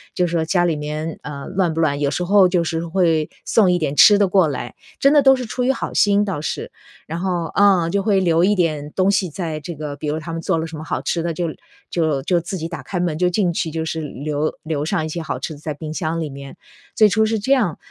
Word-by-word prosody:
就 180 - +2
说 165 -1 0
家 175 +1 +2
里 165 -2 +1
面 150 +2 -5
呃， 140 -1 -7
乱 185 -3 0
不 165 - -3
乱？ 145 -2 +1
有 145 - +1
时 180 - -2
候 195 +1 +5
就 175 -2 +1
是 165 +1 -3
会， 165 -3 +1 0.2
送 205 -5 +4
一 180 - +2
点 145 -2 -2
吃 205 +6 +8
的 200 - +3
过 185 -2 +3
来， 145 - -5 0.3
真 275 +1 +4
的 295 - +6
都 270 -1 +7
是 255 -1 -5
出 250 +3 -3
于 255 - +3
好 270 - -4
心， 205 0 +3
倒 190 -7 -3
是。 155 - -4 0.4
然 165 +2 -4
后 175 -2 -1
嗯， 190 -5 +4
就 200 - +1
会 200 -2 +3
留 170 -2 +2
一 205 +2 +3
点 155 -4 -1
东 190 +1 +2
西 190 -3 0
在 160 -1 -4
这 165 +3 -7
个 150 -1 -5
比 150 - -5
如 150 +1 -1
他 165 +1 -7
们 165 - -4
做 165 - 0
了 160 - -2
什 160 - -9
么 155 - -7
好 - - -3
吃 170 - -1
的， 170 - -2
就 175 0 -1 0.4
就 155 -5 0
就 175 +2 +2
自 180 +3 -5
己 165 -1 -4
打 165 -6 -6
开 180 +7 -4
门， 175 -3 0
就 180 0 +2
进 180 -1 +1
去 165 - -2
就 160 0 -3
是 160 0 -3
留 150 +1 -3
留 155 -2 -2
上 160 -2 -1
一 - - -5
些 170 +2 -4
好 160 - -4
吃 160 - -5
的 145 - -12
在 155 0 -4
冰 155 +1 -7
箱 165 -1 -2
里 155 - -3
面， 140 0 -10 0.4
最 215 -2 +6
初 220 +2 +2
是 220 0 0
这 220 +7 -2
样， 215 - +1
170 Hz, 290 characters per minute, -20 LUFS, 155-190 Hz, 0.4 s, 吃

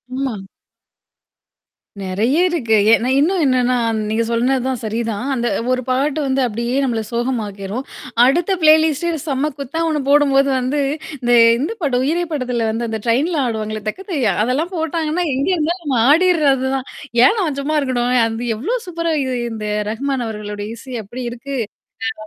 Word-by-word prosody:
ஆமா. 265 -4 -2 1.7
நெறைய 215 - 0
இருக்கு. 240 -11 +1 0.2
ஏன்ன 240 +3 +2
இன்னும் 350 +4 +2
என்னன்னா 255 -2 +2 0.3
நீங்க 225 +1 +1
சொன்னது 250 +3 +1
தான் 255 -3 -2
சரிதான். 225 +2 -2
அந்த 240 -1 -1 0.2
ஒரு 255 0 +1
பாட்டு 275 +4 0
வந்து 270 0 +1
அப்டியியே 235 +4 -2
நம்மள 235 -4 0
சோகமாக்கிரும். 230 -2 -3 0.4
அடுத்த 335 +8 +2
ப்ளேலிஸ்ட்டே 315 +1 +4 0.2
செம்ம 280 +2 0
குத்தா 280 +4 -4
ஒண்ணு 300 -3 0
போடும்போது 280 -1 +4
வந்து 260 +3 0 0.4
இந்த 240 0 0 0.3
இந்த 300 +10 -1
படம் 255 -4 +1
உயிரே 330 +6 +1
படத்துல 250 -5 -1
வந்து 230 +1 -2
அந்த 220 0 -3
ட்ரெயின்ல 290 +8 +1
ஆடுவாங்களே! 215 -2 -3
தக்கத்தையா. 290 - -1
அதெல்லாம் 290 - -1
போட்டாங்கன்னா, 320 +1 -1
எங்கே 285 +8 0
இருந்தாலும் 340 +3 -1
நம்ம 270 -4 0
ஆடிர்றது 305 -6 +3
தான். 265 0 -4 0.4
ஏன் 440 - +4
நான் 310 -8 -1
சும்மா 305 +3 -1
இருக்கணும்? 250 -2 0
அது 230 +2 -4
எவ்ளோ 395 - -1
சூப்பரா 335 -2 -2
இது 260 -1 -2 0.2
இந்த 215 -1 -5 0.2
ரஹ்மான் 260 +2 -2
அவர்களுடைய 210 -1 -5
இசை 255 +2 -8
அப்டி 245 +6 -7
இருக்கு! 275 +3 -6 0.7
ஆ 215 - -8
260 Hz, 150 wpm, -19 LUFS, 235-305 Hz, 1.7 s, ப்ளேலிஸ்ட்டே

